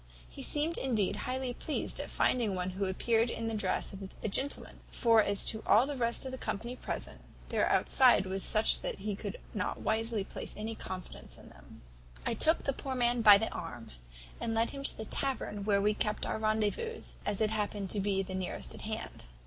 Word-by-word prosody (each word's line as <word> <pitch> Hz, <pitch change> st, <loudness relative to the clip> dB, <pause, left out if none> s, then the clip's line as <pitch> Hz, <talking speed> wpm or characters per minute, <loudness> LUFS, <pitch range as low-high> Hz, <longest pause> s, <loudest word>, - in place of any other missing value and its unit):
He -, -, -10 dB
seemed 310 Hz, +3 st, +4 dB
indeed 215 Hz, -7 st, 0 dB
highly 255 Hz, +3 st, -3 dB
pleased 295 Hz, +4 st, -2 dB
at -, -, -5 dB
finding 225 Hz, -6 st, +1 dB
one 180 Hz, 0 st, -2 dB
who 195 Hz, +2 st, -2 dB
appeared 225 Hz, +5 st, +1 dB
in 230 Hz, -, -4 dB
the 225 Hz, -, -2 dB
dress 200 Hz, -3 st, -1 dB
of 195 Hz, -, -8 dB, 0.2 s
a -, -, 0 dB
gentleman; 270 Hz, +7 st, -3 dB
for 230 Hz, -2 st, +4 dB
as 200 Hz, -1 st, 0 dB
to 220 Hz, -, 0 dB
all 230 Hz, +4 st, +6 dB
the 290 Hz, +1 st, -4 dB
rest 235 Hz, 0 st, 0 dB
of 260 Hz, -, -4 dB
the 260 Hz, -, -6 dB
company 235 Hz, +5 st, -4 dB
present, -, -, -5 dB, 0.3 s
their -, -, +1 dB
outside 250 Hz, -7 st, +4 dB
was 190 Hz, +1 st, -1 dB
such 215 Hz, +3 st, +4 dB
that -, -, -3 dB
he 205 Hz, +1 st, -3 dB
could 200 Hz, -1 st, -5 dB, 0.2 s
not 195 Hz, -4 st, -2 dB
wisely 220 Hz, -1 st, 0 dB
place -, -, -4 dB
any 220 Hz, +2 st, -4 dB
confidence 185 Hz, -4 st, -8 dB
in -, -, -14 dB
them. -, -, -16 dB, 0.4 s
"I -, -, +1 dB
took 320 Hz, +2 st, +4 dB
the 275 Hz, -, 0 dB
poor 265 Hz, 0 st, -4 dB
man 240 Hz, -1 st, +2 dB
by 210 Hz, -2 st, +9 dB
the 225 Hz, +2 st, -1 dB
arm, 120 Hz, -9 st, -7 dB, 0.5 s
and 225 Hz, -1 st, -2 dB
led 225 Hz, +1 st, +2 dB
him 275 Hz, 0 st, -6 dB
to -, -, 0 dB
the 220 Hz, -, -5 dB
tavern 215 Hz, -6 st, -2 dB
where 200 Hz, -1 st, +3 dB
we 210 Hz, +1 st, +3 dB
kept 210 Hz, 0 st, 0 dB
our -, -, -2 dB
rendezvous, 220 Hz, -, 0 dB, 0.2 s
as 205 Hz, -1 st, -2 dB
it 215 Hz, -1 st, +2 dB
happened 205 Hz, -2 st, -2 dB
to 210 Hz, -, +1 dB
be 195 Hz, -1 st, +1 dB
the 190 Hz, 0 st, -7 dB
nearest 185 Hz, -1 st, -2 dB
at -, -, -8 dB
hand. -, -, -6 dB
220 Hz, 210 wpm, -32 LUFS, 200-245 Hz, 0.5 s, by